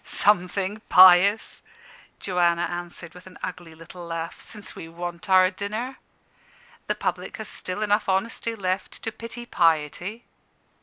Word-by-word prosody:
"Something 200 +1 +1
pious," 185 +3 +6 0.6
Joanna 175 -2 +1
answered 175 -1 -6
with 180 +1 -14
an 185 - -13
ugly 175 -3 -6
little 165 +2 -11
laugh, 165 -1 -5
"since 210 -2 -7
we 165 - -9
want 175 +1 -7
our 185 0 +6
dinner. 220 +6 -4 0.9
The - - 0
public - - -3
has - - -6
still 185 +4 -5
enough 205 0 +1
honesty 225 +4 -1
left 190 -1 -3
to 225 - -2
pity 230 +2 -8
piety." 170 +5 0
185 Hz, 135 wpm, -25 LUFS, 175-210 Hz, 0.9 s, pious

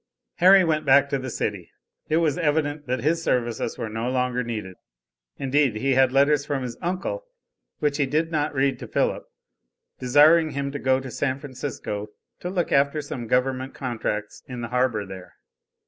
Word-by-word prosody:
Harry 190 +2 +7
went 155 -2 +1
back 140 +1 +5
to 140 - 0
the 130 0 -5
city. 100 -6 -3 0.4
It 155 - +3
was 165 -3 +2
evident 150 -3 0
that 125 -1 -1
his 165 +3 +1
services 120 -6 -1
were 115 - -3
no 115 +3 -3
longer 125 -1 0
needed. 105 -6 -5 0.6
Indeed, 135 -3 +1
he 135 +5 +1
had 130 -1 +4
letters 140 +2 +3
from 145 -2 -2
his 120 -2 -5
uncle, 190 - -3 0.5
which 145 -1 0
he 140 -3 +1
did 160 +4 0
not 150 -2 -1
read 135 0 +1
to - - -7
Philip, - - 0 0.7
desiring 150 +6 +5
him 140 0 -2
to 145 - -5
go 130 0 +2
to 130 -1 -8
San 130 +1 -1
Francisco 130 -6 -5 0.3
to 180 - -4
look 180 -2 -1
after 140 +2 +3
some 130 -5 -6
government 130 +2 0
contracts 110 -5 -4
in 125 -2 -6
the 115 - -5
harbor 125 -4 0
there. 95 -2 -10
135 Hz, 180 wpm, -24 LUFS, 125-150 Hz, 0.7 s, Harry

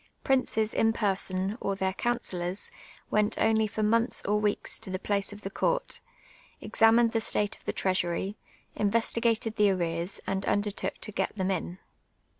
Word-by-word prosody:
Princes 225 -5 +1
in 225 - +3
person, 195 0 -1
or 195 - -1
their 190 -1 -1
councillors, 195 -5 -2 0.4
went 210 0 +2
only 220 0 +3
for 215 0 -3
months 230 +3 +2
or 210 +1 +2
weeks 210 -1 +1
to - - -6
the 185 - -2
place 200 +1 -1
of 205 0 -10
the 195 - -5
court, - - -1 0.6
examined 225 +1 +4
the 225 - 0
state 210 -1 +1
of - - -23
the - - 0
treasury, 185 +1 -1 0.4
investigated 225 +1 +1
the 210 -1 +5
ari'cars, 170 0 -1
and 190 0 -1
undertook 205 0 -1
to 215 - -3
get 190 0 -2
them 190 -1 0
in. 180 -1 -3
205 Hz, 160 wpm, -28 LUFS, 190-225 Hz, 0.6 s, the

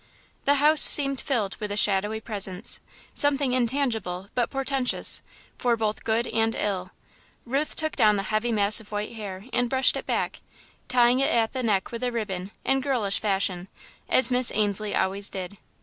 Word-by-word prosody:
The 285 - +4
house 300 +2 +5
seemed 275 -2 +6
filled 220 -8 -2
with 210 -1 -5
a 205 - -3
shadowy 210 +1 +1
presence 200 -2 -2 0.3
something 280 -3 +2
intangible, 225 -8 -1
but 245 -2 0
portentous, 270 -2 +1 0.4
for 240 -2 +1
both 215 -1 -3
good 225 +1 0
and 225 0 -1
ill. 185 -3 -3 0.6
Ruth 275 +5 -2
took 315 -1 -1
down 210 -1 +4
the 195 - -2
heavy 215 +3 -1
mass 210 -1 +3
of 215 -1 -15
white 210 0 -4
hair 205 -3 -8
and 245 -1 0
brushed 260 +1 +3
it - - -6
back, - - -2 0.5
tying 245 0 +3
it 275 - +2
at 225 -1 +1
the 260 - -3
neck 205 -5 -1
with 235 +1 -6
a 250 - 0
ribbon, 195 -5 -4 0.2
in 270 0 +1
girlish 245 -8 -1
fashion, 195 -3 -1 0.4
as 255 -1 +3
Miss 250 0 +4
Ainslie 210 0 -1
always 195 +2 -1
did. 190 +1 -7
225 Hz, 175 wpm, -25 LUFS, 200-255 Hz, 0.6 s, seemed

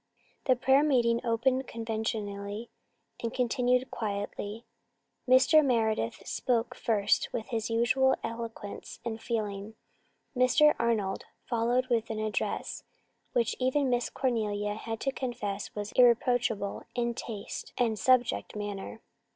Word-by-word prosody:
The 255 - +4
prayer 265 +3 +4
meeting 240 -6 +2
opened 255 +3 +1
conventionally 220 -1 -4 0.5
and 230 - -2
continued 250 +1 +1
quietly. 205 +1 -4 0.6
Mr. 270 +5 +6
Meredith 220 - 0
spoke 240 -2 0
first 210 -3 +1
with 225 - -4
his 225 -2 -2
usual 260 +3 +3
eloquence 230 -3 -6
and 225 -1 -4
feeling. 215 -2 -3 0.6
Mr. 270 +4 +5
Arnold 215 -5 0 0.2
followed 240 +2 +1
with 230 -2 +1
an 220 - -3
address 215 -1 -2 0.5
which 235 -2 +1
even 260 +1 +2
Miss 245 -1 +1
Cornelia 210 -5 -1
had 225 +1 -5
to 270 - 0
confess 220 -7 -4
was 205 0 -4
irreproachable 240 -4 +3
in 235 -1 0
taste 220 -3 -6
and 225 -4 +1
subject 250 0 +2
matter. 205 +1 -5
230 Hz, 120 wpm, -29 LUFS, 215-250 Hz, 0.6 s, Mr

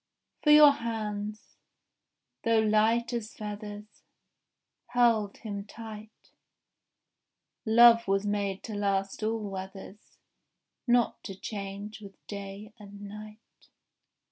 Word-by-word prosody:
For 300 - +1
your 300 -1 +9
hands, 215 -4 -5 0.9
though 230 -1 +3
light 220 +2 +2
as 230 -2 -4
feathers, 210 0 -8 0.9
Held 235 -4 +2
him 205 -3 -6
tight: 220 0 -11 1.4
Love 230 0 +7
was 195 +1 +1
made 200 -2 -2
to 220 - -6
last 195 -1 -1
all 220 -1 -1
weathers, 195 +1 -9 0.7
Not 240 -1 +2
to 195 - -6
change 200 +1 -7
with 195 -1 -11
day 200 +1 -8
and 200 -1 -12
night. 210 +2 -12
210 Hz, 100 wpm, -29 LUFS, 200-225 Hz, 1.4 s, your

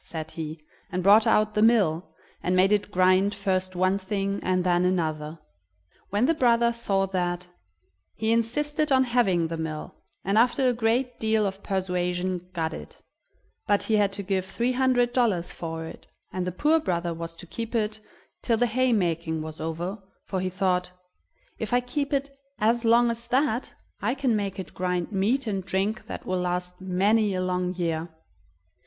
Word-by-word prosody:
said 160 -1 -6
he, 160 -1 -5 0.3
and 180 0 -2
brought 210 +4 +6
out 215 -1 +3
the 210 - +1
mill, 200 -8 +4 0.4
and 180 - 0
made 185 +2 +4
it 205 -1 +1
grind 185 +1 +3
first 185 -2 -1
one 185 +2 +2
thing 200 0 -2
and 185 0 +1
then 175 -1 +2
another. 160 -4 -1 0.7
When 205 +5 +2
the 330 - +3
brother 235 -4 +3
saw 195 -4 0
that, 180 -2 -2 0.7
he 220 0 0
insisted 295 +7 0
on 260 -1 +5
having 235 -9 +2
the 165 0 -3
mill, 160 -1 -5 0.3
and 200 +3 +3
after 250 +3 +3
a 250 - +3
great 240 +2 0
deal 220 -1 +2
of 195 0 -4
persuasion 180 -1 -2
got 160 -3 -2
it; - - -9 0.7
but 205 -1 +3
he 220 - +1
had 200 -1 +3
to 200 - -4
give 190 -1 0
three 235 +6 0
hundred 250 -1 +2
dollars 205 -9 +1
for 165 -1 -5
it, - - -11 0.3
and 185 -1 -2
the - - -1
poor 300 - +3
brother 170 - -1
was 165 0 -6
to 170 - -10
keep 230 +6 -6
it 215 -1 0 0.4
till 230 - +1
the 245 - +3
haymaking 180 -10 0
was 155 0 -8
over, 170 +6 -3 0.3
for 190 - -2
he 185 - -1
thought: 180 -1 0 0.7
"If 220 +1 -3
I 245 - +5
keep 280 +4 -3
it 275 0 -1 0.2
as 230 +3 +2
long 235 +1 +4
as 235 +1 -6
that, 260 -1 0 0.3
I 240 +6 0
can 260 -4 +1
make 200 -2 -2
it 190 - -7
grind 180 +1 -2
meat 220 +7 +1
and 195 -4 -2
drink 195 +4 -1
that - - -7
will 185 0 -1
last 180 0 -3
many 200 +3 +2
a 185 - -1
long 180 0 -1
year." 165 -1 -2
195 Hz, 180 wpm, -26 LUFS, 180-230 Hz, 0.7 s, brought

